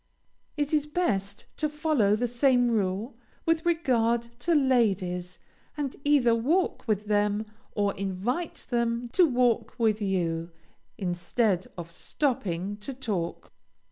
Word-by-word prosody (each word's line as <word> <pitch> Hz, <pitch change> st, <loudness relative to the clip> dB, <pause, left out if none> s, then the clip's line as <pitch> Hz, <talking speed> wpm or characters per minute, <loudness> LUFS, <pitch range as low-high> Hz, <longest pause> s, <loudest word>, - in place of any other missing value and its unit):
It 290 Hz, +1 st, -1 dB
is 300 Hz, -1 st, +2 dB
best 205 Hz, -, -1 dB
to 305 Hz, -, 0 dB
follow 295 Hz, -9 st, +2 dB
the 245 Hz, +3 st, 0 dB
same 245 Hz, 0 st, +3 dB
rule 215 Hz, +3 st, -1 dB, 0.3 s
with 330 Hz, 0 st, +1 dB
regard 240 Hz, -9 st, +2 dB, 0.2 s
to 340 Hz, -1 st, +1 dB
ladies, 195 Hz, -, +1 dB, 0.4 s
and 280 Hz, -3 st, -2 dB
either 280 Hz, -5 st, +4 dB
walk 285 Hz, +8 st, +1 dB
with 210 Hz, -1 st, 0 dB
them 210 Hz, 0 st, +1 dB, 0.3 s
or 205 Hz, -1 st, +1 dB
invite 200 Hz, -, -3 dB
them 235 Hz, 0 st, 0 dB
to 355 Hz, +6 st, +5 dB
walk 245 Hz, -4 st, +1 dB
with 220 Hz, -3 st, +2 dB
you, 170 Hz, -4 st, -1 dB, 0.5 s
instead 185 Hz, +1 st, 0 dB
of 170 Hz, -1 st, -7 dB
stopping 200 Hz, -, -2 dB
to 230 Hz, +6 st, -7 dB
talk. 200 Hz, -10 st, -4 dB
230 Hz, 125 wpm, -27 LUFS, 195-275 Hz, 0.5 s, to